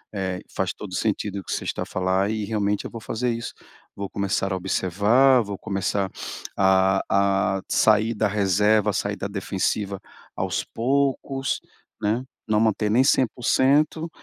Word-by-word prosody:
Eh, 95 -2 -2 0.2
faz 95 -1 -1
todo 105 - -9
o - - -2
sentido 105 -2 -1
o 95 - -9
que - - -7
você - - -3
está - - -2
a - - -7
falar 95 +2 0
e 110 -2 -2
realmente 105 -1 -1
eu - - -6
vou 115 - -8
fazer 120 +3 -2
isso. 115 0 -5 0.4
Vou 100 -1 -5
começar 100 -1 -1
a - - 0
observar, 105 +8 +3
vou 100 -2 -6
começar 100 0 -1 0.5
a 95 0 +4
a 95 -1 +2
sair 110 +1 +3
da 105 +1 +1
reserva, 105 +1 +2
sair 100 +1 -2
da 100 - -3
defensiva 100 0 -2 0.4
aos - - -1
poucos, 135 +2 -1 0.4
né. 110 +4 0 0.3
Não 105 - +4
manter 110 -1 +1
nem 125 +4 +5
100%, 140 +5 +2
105 Hz, 160 wpm, -24 LUFS, 95-115 Hz, 0.5 s, nem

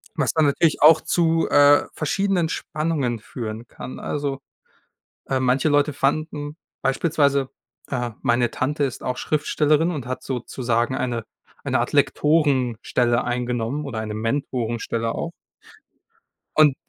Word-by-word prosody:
was - - +1
dann 160 -1 +3
natürlich 150 +2 +2
auch 155 +2 +7
zu, 165 -1 +1
äh, 145 0 +6
verschiedenen 180 +2 0
Spannungen 150 -9 -2
führen 115 0 -7
kann. 130 - -9
Also, 140 -2 -3 0.9
äh, 135 - +1
manche 130 +3 +2
Leute 145 0 +2
fanden 145 +1 -1 0.3
beispielsweise, 140 -1 +1 0.4
äh 120 -3 -2
meine 120 -2 +2
Tante 145 +3 -1
ist 130 -3 -3
auch 125 0 -2
Schriftstellerin 155 +2 +1
und 145 -7 -5
hat 130 - -4
sozusagen 120 -1 -1
eine 120 -3 -2 0.4
eine - - +1
Art - - -2
Lektorenstelle 125 -5 +2
eingenommen 125 +3 -2
oder 125 -5 -4
eine 110 -1 -4
Mentorenstelle 115 -1 -2
auch 170 - -4 1.3
und 150 -3 +6
135 Hz, 125 wpm, -23 LUFS, 120-150 Hz, 1.3 s, auch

